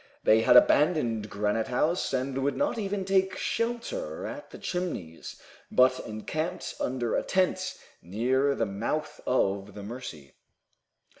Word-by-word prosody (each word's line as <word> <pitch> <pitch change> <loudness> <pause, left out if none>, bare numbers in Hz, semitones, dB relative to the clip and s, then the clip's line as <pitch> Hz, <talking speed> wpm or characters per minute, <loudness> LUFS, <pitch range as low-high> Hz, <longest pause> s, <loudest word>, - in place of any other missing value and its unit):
They 110 +1 +5
had 125 - +7
abandoned 125 -7 +3
Granite 105 +2 0
House, 155 +8 0
and 130 0 -1
would 140 +1 0
not 285 -5 0
even 200 -2 -2
take 190 0 +2
shelter 240 - -2
at - - -7
the - - -10
Chimneys, 170 - -5 0.3
but 130 0 +4
encamped 155 +11 -4
under 125 -3 -1
a - - +2
tent, 185 0 0 0.2
near 130 +10 +1
the 115 - 0
mouth 115 +10 -3
of 100 -5 0
the 105 - -7
Mercy. 100 - -8
130 Hz, 135 wpm, -28 LUFS, 110-180 Hz, 0.3 s, had